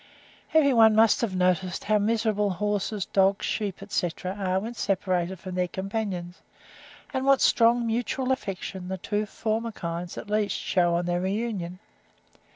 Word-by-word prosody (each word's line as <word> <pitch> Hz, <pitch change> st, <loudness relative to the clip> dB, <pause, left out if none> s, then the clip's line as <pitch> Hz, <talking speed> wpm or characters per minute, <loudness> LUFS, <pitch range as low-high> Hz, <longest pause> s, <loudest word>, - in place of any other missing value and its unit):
Every 285 Hz, -4 st, +5 dB
one 220 Hz, -2 st, +6 dB
must 220 Hz, -1 st, +5 dB
have 215 Hz, -6 st, -1 dB
noticed 180 Hz, 0 st, +1 dB
how 215 Hz, 0 st, +2 dB
miserable 215 Hz, -1 st, +1 dB
horses, 205 Hz, +1 st, -1 dB
dogs, 195 Hz, +1 st, +2 dB
sheep, 200 Hz, -3 st, -3 dB
etc., 185 Hz, -2 st, -2 dB
are 190 Hz, -2 st, -1 dB
when 225 Hz, +4 st, -5 dB
separated 185 Hz, -4 st, -1 dB
from 185 Hz, 0 st, -7 dB
their 180 Hz, 0 st, 0 dB
companions, 190 Hz, -2 st, -4 dB, 0.7 s
and 260 Hz, -1 st, -1 dB
what 275 Hz, -1 st, +5 dB
strong 235 Hz, 0 st, +4 dB
mutual 245 Hz, +3 st, -1 dB
affection 195 Hz, -6 st, -4 dB
the 190 Hz, 0 st, -3 dB
two 205 Hz, +3 st, -2 dB
former 225 Hz, +3 st, -2 dB
kinds, 170 Hz, -3 st, -5 dB
at -, -, -7 dB
least, 210 Hz, 0 st, 0 dB
shew 180 Hz, -2 st, +1 dB
on 175 Hz, 0 st, 0 dB
their 175 Hz, 0 st, 0 dB
reunion. 190 Hz, -3 st, -2 dB
200 Hz, 155 wpm, -26 LUFS, 185-225 Hz, 0.7 s, one